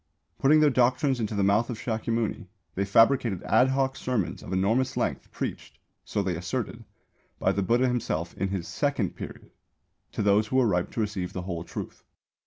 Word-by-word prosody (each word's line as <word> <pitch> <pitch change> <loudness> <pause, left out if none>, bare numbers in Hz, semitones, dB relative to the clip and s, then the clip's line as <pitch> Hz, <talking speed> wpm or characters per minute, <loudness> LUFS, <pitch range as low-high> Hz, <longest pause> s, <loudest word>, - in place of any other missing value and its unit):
Putting 155 +3 +5
their 150 -1 +5
doctrines 130 +1 +2
into 110 -1 -2
the 100 - +1
mouth 100 +4 +3
of 120 - -4
Shākyamuni, 115 -2 -2 0.3
they 100 - -1
fabricated 115 -1 +3
ad 125 - +4
hoc 135 0 0
sermons 125 -10 -2
of - - -9
enormous 105 +8 +1
length, - - -2
preached - - -5 0.3
(so 100 - -2
they 95 -3 -1
asserted) 85 0 -4 0.5
by - - +2
the 100 - 0
Buddha 120 +6 +2
himself 95 -9 -2
in 95 - -1
his 95 -3 -3
"second 140 -10 -1
period" - - -9 0.6
to - - -1
those 105 +1 +3
who 130 - -3
were 130 -1 +5
ripe 90 -5 +1
to 115 - -1
receive 100 -4 -3
the 90 - -4
whole 85 -2 -4
truth. - - -7
110 Hz, 185 wpm, -27 LUFS, 95-125 Hz, 0.6 s, Putting